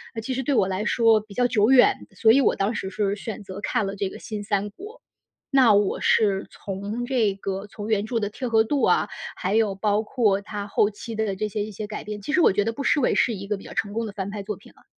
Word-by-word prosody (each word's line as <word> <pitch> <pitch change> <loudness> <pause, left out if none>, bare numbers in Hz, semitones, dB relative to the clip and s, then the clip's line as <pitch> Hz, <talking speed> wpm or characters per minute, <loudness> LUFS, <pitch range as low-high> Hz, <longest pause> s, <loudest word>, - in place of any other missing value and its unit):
啊， - - -3
其 260 - -3
实 265 - -1
对 275 +1 0
我 190 - +3
来 190 +2 -2
说 225 -2 +4
比 210 -2 -14
较 245 - +2
久 225 -2 +3
远， 260 -2 +5
所 220 +3 +5
以 275 +4 +5
我 - - +3
当 200 +4 0
时 190 - -4
是 200 +1 -1
选 215 +1 -7
择 190 +1 -8
看 220 -3 0
了 195 +1 -4
这 195 -1 -2
个 - - -10
新 210 -2 -6
三 205 0 -1
国。 420 - -11 0.5
那 260 -6 +5
我 200 -1 +2
是 200 -3 +2
从 205 +5 -5
这 235 -6 +1
个 195 +1 -5
从 205 0 -8
原 215 -1 +1
著 230 0 -1
的 205 -1 -2
贴 250 +3 -5
合 220 -1 +4
度 285 +3 0
啊， - - +3 0.3
还 195 +4 -1
有 215 -3 +2
包 210 +2 +1
括 210 -4 +1
它 205 0 -6
后 205 +1 +2
期 220 +2 -8
的 210 -3 -1
这 215 - -1
些 205 0 -3
一 215 - -6
些 210 +1 -6
改 210 - -6
变， 210 -1 -6
其 290 +10 -4
实 335 - +4
我 - - +6
觉 205 +2 +1
得 225 - -1
不 280 - -5
失 290 - +3
为 245 - +2
是 235 - +2
一 195 0 -7
个 210 - 0
比 195 - -11
较 - - -10
成 205 0 -2
功 230 0 -2
的 210 - -5
翻 200 -1 -5
拍 205 -1 -5
作 205 -2 -5
品 - - -18
了。 - - -25
210 Hz, 300 characters per minute, -24 LUFS, 200-230 Hz, 0.5 s, 我